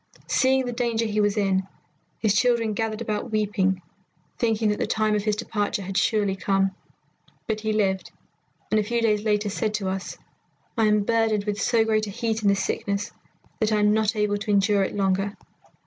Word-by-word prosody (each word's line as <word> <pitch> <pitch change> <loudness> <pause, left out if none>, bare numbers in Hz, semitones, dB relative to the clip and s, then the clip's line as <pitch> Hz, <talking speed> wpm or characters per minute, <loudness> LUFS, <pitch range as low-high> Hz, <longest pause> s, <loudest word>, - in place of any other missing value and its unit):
Seeing 265 0 +2
the 245 - -2
danger 230 -2 0
he 215 -1 0
was 205 0 +1
in, 190 -2 +1 0.5
his 215 -3 +1
children 230 -1 +2
gathered 220 +1 -2
about 215 +1 -3
weeping, 200 -4 0 0.6
thinking 225 -2 +1
that 210 - -1
the - - 0
time 215 -1 +1
of 210 -1 0
his 215 -1 +2
departure 205 -2 -2
had 190 +1 -6
surely 205 -1 +2
come. 195 0 +1 0.7
But 220 -1 -2
he 215 0 -1
lived, 195 -3 0 0.6
and 215 - +4
a - - +1
few 235 +3 -1
days 215 -2 +2
later 210 -1 0
said 215 +1 -1
to 195 -3 -2
us, 190 0 -4 0.6
'I 225 -3 +2
am 210 -1 +3
burdened 225 -1 +1
with 205 0 -3
so 230 -2 +3
great 215 -1 +1
a - - -5
heat 225 +1 -2
in 210 - +1
this 200 -1 +3
sickness 200 +1 -2 0.5
that 220 -1 +1
I 215 - +3
am 210 0 +4
not 220 0 +1
able 210 -1 +1
to 210 - -7
endure 200 0 +3
it 190 - -1
longer. 195 +1 0
210 Hz, 195 wpm, -25 LUFS, 200-220 Hz, 0.7 s, and